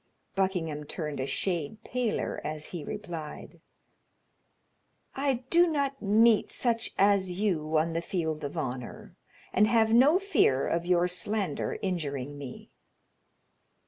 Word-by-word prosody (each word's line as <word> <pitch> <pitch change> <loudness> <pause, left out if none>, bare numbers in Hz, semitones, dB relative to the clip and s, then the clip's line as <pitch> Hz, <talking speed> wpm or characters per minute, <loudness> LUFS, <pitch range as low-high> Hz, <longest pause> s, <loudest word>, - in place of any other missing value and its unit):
Buckingham 170 -6 -1
turned 150 -2 -4
a 130 - -1
shade 180 +5 -2
paler 245 -3 -2
as 155 0 -4
he 170 -4 -6
replied: 170 -5 -7 1.5
"I 270 -2 -1
do 345 +1 +6
not 280 -4 -1
meet 220 +2 +4
such 230 -2 0
as 200 -1 +4
you 175 -5 0
on 165 +2 +1
the 165 - -1
field 160 -4 -2
of 145 +4 -5
honor, 125 -5 -5 0.4
and 210 +3 +5
have 220 0 +3
no 275 +8 +6
fear 375 - +2
of 170 +1 -1
your 180 -1 +3
slander 180 -1 -2
injuring 145 -7 -3
me." 135 -3 -9
180 Hz, 125 wpm, -29 LUFS, 155-220 Hz, 1.5 s, do